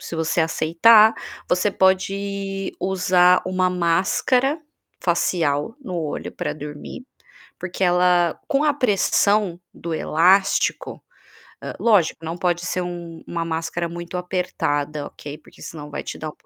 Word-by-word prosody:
se - - -7
você 160 +1 0
aceitar, 210 +8 +5 0.3
você 185 +3 +2
pode 195 +1 -1
usar 180 -1 +3
uma 185 0 +1
máscara 190 - +1 0.4
facial 170 0 0
no 185 -8 -6
olho 155 -3 -4
para - - -3
dormir, 150 - -9 0.5
porque 185 +1 -4
ela, 180 -1 +3
com 285 -1 +1
a 300 - +4
pressão 205 -6 +1
do 170 -1 -6
elástico 190 +6 +1 0.6
hã, - - -6
lógico 185 -8 +2
não 165 +1 -4
pode 175 -1 -1
ser 185 - -2
um 170 -2 -7
uma 170 -1 -3
máscara 165 +1 -3
muito 175 +1 -7
apertada, 150 -5 -2
ok. 145 0 -9
Porque - - -20
senão 150 -2 -8
vai - - -5
te - - -7
dar 155 -1 -6
180 Hz, 130 wpm, -22 LUFS, 165-195 Hz, 0.6 s, aceitar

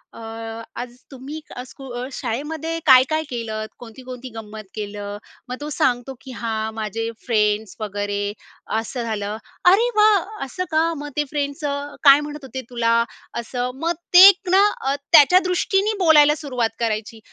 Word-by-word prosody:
अ, - - -10 0.6
आज 245 -1 -8 0.2
तुम्ही 275 +4 -8 0.2
अ, 250 - -5
स्कुल 250 -2 -7
शाळेमध्ये 310 +8 -3
काय-काय 275 +3 +5
केलतं? 220 -3 -4
कोणती-कोणती 250 +2 -9
गंमत 220 -1 -8
केलं? 205 -1 -5 0.3
मग 250 - -3
तो 295 - -4
सांगतो, 245 +1 0
"की 260 - -10
हां, 220 -1 -2
माझे 225 +1 -3 0.2
फ्रेंड्स 210 -3 +1
वगैरे, 205 -1 -3 0.6
असं 235 +2 -5
झालं". 215 -2 -3 0.3
अरे 455 +6 +4
वाह! 425 -3 +3
असं 365 +8 -4
का? 315 0 +3
मग 295 +1 -6
ते 295 - +3
फ्रेंड्सचं 285 -1 -3
काय 280 -1 +8
म्हणत 295 -1 -7
होते 260 0 -6
तुला? 230 -2 +1 0.5
असं, 245 +1 -3
मग 335 +1 +1 0.2
ते 365 +2 +11
एक 385 -2 +3
ना 385 +2 +6 0.2
अ, 270 +1 0 0.2
त्याच्या 325 +3 +8
दृष्टीने 390 +4 +1
बोलायला 300 -2 +6
सुरुवात 240 -5 -2
करायची. 225 0 -2
255 Hz, 150 wpm, -21 LUFS, 225-300 Hz, 0.6 s, ते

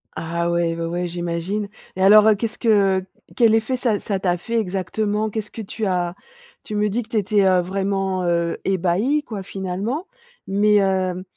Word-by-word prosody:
Ah 170 +1 -2
ouais, 170 -1 +1
ouais, 165 - -4
ouais, 175 +1 -2
j'imagine 175 +4 -3 0.3
et 190 - -4
alors, 210 +2 +7
heu, 215 - +6
qu'est-ce 225 +2 -3
que 200 -5 +3 0.4
quel 230 -3 +5
effet 230 +4 0
ça 230 -5 0
ça 200 -2 -2
t'a 180 -2 0
fait 230 +7 -5
exactement? 210 +2 -1
Qu'est-ce 215 0 -5
que 225 - -7
tu 215 +1 -4
as? 180 -2 -1 0.5
Tu 210 - -6
me 210 0 +1
dis 230 +5 -1
que 220 - -12
tu 235 - -5
étais, 205 0 +2
heu, 185 -1 +4
vraiment, 190 0 -1
heu, 170 -1 0
ébahi, 195 - +1
quoi, 215 -7 -6
finalement, 195 - -4 0.4
mais 205 +1 +3
heu, 185 -1 0
195 Hz, 185 wpm, -21 LUFS, 180-215 Hz, 0.5 s, alors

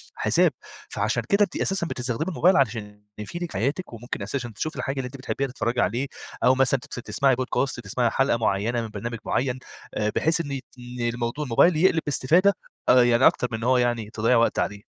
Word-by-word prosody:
حساب. - - +3 0.4
فعشان - - -1
كده 200 +1 +4
أنتِ 200 - -2
أساسًا 190 -3 -1
بتستخدمي 125 +3 -3
الموبايل 185 +1 +3
علشان 105 -5 -1
يفيدِك 170 +11 -6
في - - -4
حياتِك، 140 - -2
وممكن 115 -2 -6
أساسًا 120 +4 -4
تشوفي 155 +8 -3
الحاجة 135 - -3
اللي 135 - -2
أنتِ 135 +2 -10
بتحبيها، 135 +1 -2
تتفرجي 125 -1 -1
عليه، 120 +7 0 0.4
أو 125 +1 +5
مثلًا 135 0 +2
تس - - -10
تسمَعي 135 -2 +2
Podcast، 130 +1 -1
تسمَعي 115 +4 0
حلقة 135 +1 +1
معيّنة 110 +2 0
من 115 - -4
برنامج 115 +3 -5
معيّن، 130 0 -1 0.3
آآ 105 0 0
بحيث 165 +2 +2
إن 140 -4 -4 0.2
ن 125 0 -8
الموضو 120 +4 -2
الموبايل 150 +6 +4
يقلب 165 -1 +3
باستفادة، 170 +8 +3 0.4
آآ، 125 0 +7
يعني 120 +1 +5
أكتر 125 - +1
من 115 - -2
إن 115 - -7
هو 130 +1 +3
يعني 120 -3 0
تضيّع 115 +3 +1
وقت 115 - +2
عليه. 100 0 -2
125 Hz, 195 wpm, -24 LUFS, 115-140 Hz, 0.4 s, آآ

